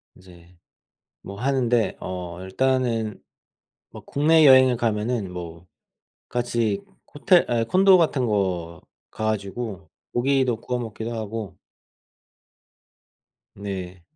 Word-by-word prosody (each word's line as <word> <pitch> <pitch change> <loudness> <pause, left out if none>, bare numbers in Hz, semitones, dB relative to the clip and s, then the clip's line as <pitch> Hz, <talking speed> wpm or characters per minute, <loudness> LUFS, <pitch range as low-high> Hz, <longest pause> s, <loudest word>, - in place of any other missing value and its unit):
인제 90 -1 -18 0.6
뭐 100 +1 -9
하는데 125 -3 +1
어 90 -1 -6
일단은 115 +1 -1 0.7
뭐 - - -11
국내 155 +2 +4
여행을 130 -2 +7
가면은 110 -3 -1
뭐 85 -1 -8 0.6
같이 115 -4 -1 0.3
호텔 175 +2 +3
아 115 -1 +1
콘도 190 - +5
같은 150 -7 +1
거 90 -6 -2 0.3
가 110 - -4
가지고 100 -2 -4 0.2
고기도 130 0 +2
구워 125 0 -3
먹기도 115 0 -5
하고 110 -1 -5 2.0
네 95 -3 -7
110 Hz, 190 characters per minute, -23 LUFS, 95-125 Hz, 2.0 s, 여행을